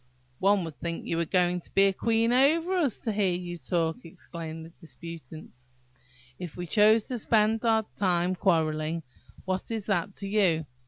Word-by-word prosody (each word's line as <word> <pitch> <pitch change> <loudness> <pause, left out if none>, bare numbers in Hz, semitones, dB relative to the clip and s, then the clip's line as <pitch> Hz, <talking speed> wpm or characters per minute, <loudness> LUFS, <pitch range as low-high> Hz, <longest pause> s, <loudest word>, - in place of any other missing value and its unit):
"One 195 0 +3
would 160 -3 -9
think 170 -1 -4
you 165 - -2
were 170 - 0
going 180 +1 +2
to - - -13
be 195 0 +5
queen 230 +3 +1
over 320 +8 +3
us, 300 - 0
to 225 - -2
hear 200 -3 +1
you 175 0 -5
talk," 165 -1 -1
exclaimed 165 -1 -8
the 165 - -13
disputants. 160 -6 -11 0.7
"If 180 -3 -7
we 175 - -4
choose 215 +4 +4
to 250 -2 -3
spend 220 +1 +2
our 220 -1 +3
time 180 -2 +1
in - - -2
quarrelling, 160 -3 0 0.4
what 185 0 -3
is 220 -3 -3
that 200 -1 -1
to 200 - -4
you? 185 -6 +2
185 Hz, 175 wpm, -27 LUFS, 165-215 Hz, 0.7 s, be